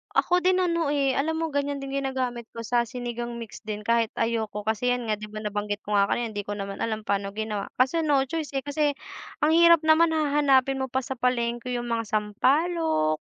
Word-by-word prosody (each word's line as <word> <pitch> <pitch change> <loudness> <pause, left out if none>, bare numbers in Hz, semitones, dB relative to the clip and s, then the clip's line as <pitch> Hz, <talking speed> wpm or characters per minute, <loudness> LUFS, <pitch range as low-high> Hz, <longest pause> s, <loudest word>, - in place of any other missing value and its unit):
Ako 360 0 +2
din 370 0 +4
ano 335 -4 +1
eh, 275 -2 +1
alam 320 +3 0
mo 325 - -1
ganiyan 285 -1 -2
din 275 - -6
ginagamit 260 -3 -2
ko 230 - -6
sa 235 +1 +1
Sinigang 240 0 -5
mix 225 -1 -10
din 210 -1 -4
kahit 230 +1 +1
ayoko 225 -2 -1
kasi 220 +4 0
'yan 245 -2 -4
nga 215 - +1
'di 215 - -7
ba 215 0 -8
nabanggit 205 0 -3
ko 210 0 -1
nga 200 - +5
kanina, 235 +3 -1
hindi 205 -2 -5
ko 205 - -3
naman 195 -1 -5
alam 220 -1 -3
paano 200 -1 -2
ginawa, 215 -1 -3 0.2
kaso 265 +6 +2
no 285 -3 +3
choice 315 -2 -4
eh 270 - 0
kasi 290 +1 0 0.5
ang 300 - +4
hirap 335 -1 +7
naman 320 +1 +4
hahanapin 280 -3 +3
mo 265 - -1
pa 260 0 -2
sa 265 +1 -6
palengke 240 0 -1
yung 240 0 -3
mga 230 -1 -1
sampalok 215 - +1
245 Hz, 210 wpm, -26 LUFS, 215-285 Hz, 0.5 s, hirap